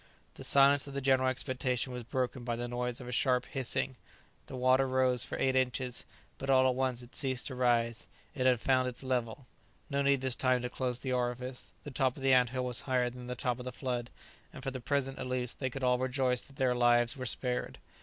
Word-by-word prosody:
The -, -, -10 dB
silence 140 Hz, 0 st, +5 dB
of 140 Hz, -, -8 dB
the -, -, 0 dB
general 130 Hz, -1 st, +3 dB
expectation 130 Hz, -1 st, -2 dB
was 125 Hz, -, -4 dB
broken 125 Hz, +1 st, -2 dB
by 120 Hz, -1 st, -2 dB
the 120 Hz, +1 st, -4 dB
noise 120 Hz, 0 st, -3 dB
of 125 Hz, -, -9 dB
a -, -, -5 dB
sharp 125 Hz, 0 st, +2 dB
hissing; 130 Hz, 0 st, -1 dB, 0.5 s
the 130 Hz, -, -7 dB
water 130 Hz, +1 st, +3 dB
rose 130 Hz, -2 st, +2 dB
for -, -, -5 dB
eight 130 Hz, 0 st, +1 dB
inches, 125 Hz, -1 st, 0 dB, 0.3 s
but 135 Hz, -, -5 dB
all 130 Hz, -1 st, +5 dB
at 130 Hz, -, +2 dB
once 130 Hz, -1 st, -1 dB
it 120 Hz, -, -15 dB
ceased 130 Hz, -3 st, -1 dB
to 130 Hz, -, -5 dB
rise; 120 Hz, -2 st, +1 dB, 0.3 s
it 130 Hz, -, +1 dB
had 125 Hz, -2 st, +4 dB
found 130 Hz, +1 st, +2 dB
its 125 Hz, +1 st, -3 dB
level. 125 Hz, 0 st, -2 dB, 0.5 s
No 140 Hz, 0 st, +1 dB
need 140 Hz, -1 st, +3 dB
this 130 Hz, -2 st, 0 dB
time 130 Hz, -1 st, +2 dB
to 125 Hz, -, -3 dB
close 125 Hz, -2 st, -2 dB
the 130 Hz, -2 st, -2 dB
orifice; 125 Hz, +1 st, -3 dB
the 145 Hz, -, -7 dB
top 130 Hz, 0 st, 0 dB
of 135 Hz, -, -8 dB
the 135 Hz, -1 st, +5 dB
ant 125 Hz, -1 st, +5 dB
hill 130 Hz, 0 st, -2 dB
was 125 Hz, -1 st, -1 dB
higher 125 Hz, -2 st, 0 dB
than 125 Hz, 0 st, -9 dB
the 125 Hz, -, -4 dB
top 125 Hz, 0 st, -1 dB
of 125 Hz, -, -7 dB
the 125 Hz, -, -4 dB
flood; 125 Hz, -2 st, -3 dB, 0.4 s
and 130 Hz, -, -10 dB
for 135 Hz, -, -2 dB
the 130 Hz, -1 st, -6 dB
present, 135 Hz, +1 st, -1 dB
at 130 Hz, -, -4 dB
least, 125 Hz, -1 st, -2 dB
they 130 Hz, -, -1 dB
could 135 Hz, +1 st, -6 dB
all 125 Hz, -1 st, +3 dB
rejoice 130 Hz, -1 st, +1 dB
that 135 Hz, -, -15 dB
their 130 Hz, -2 st, +2 dB
lives 120 Hz, +1 st, +4 dB
were 130 Hz, -2 st, -4 dB
spared! 125 Hz, 0 st, -1 dB
125 Hz, 235 wpm, -32 LUFS, 125-130 Hz, 0.5 s, silence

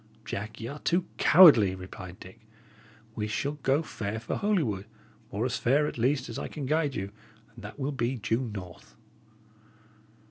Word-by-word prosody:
"Jack, 110 Hz, +2 st, -5 dB
y' 110 Hz, -, -5 dB
are 145 Hz, +4 st, -7 dB
too 175 Hz, +4 st, +1 dB
cowardly," 130 Hz, -, +8 dB
replied 95 Hz, -1 st, -9 dB
Dick. 95 Hz, -, -13 dB, 0.7 s
"We 105 Hz, -2 st, -3 dB
shall 145 Hz, +7 st, -2 dB
go 135 Hz, +5 st, +2 dB
fair 110 Hz, -7 st, -4 dB
for 115 Hz, -, -4 dB
Holywood, 135 Hz, -, 0 dB, 0.4 s
or 105 Hz, +5 st, -2 dB
as 125 Hz, -, -1 dB
fair, 140 Hz, +5 st, +2 dB
at 135 Hz, -, -4 dB
least, 130 Hz, +2 st, +1 dB
as -, -, -5 dB
I -, -, -4 dB
can 145 Hz, -3 st, -6 dB
guide 150 Hz, 0 st, 0 dB
you, 95 Hz, +1 st, -4 dB, 0.4 s
and 115 Hz, -, -13 dB
that 105 Hz, -, -9 dB
will 140 Hz, 0 st, -2 dB
be 130 Hz, -2 st, -1 dB
due 115 Hz, +2 st, 0 dB
north." 90 Hz, -4 st, -10 dB
120 Hz, 170 wpm, -28 LUFS, 105-145 Hz, 0.7 s, cowardly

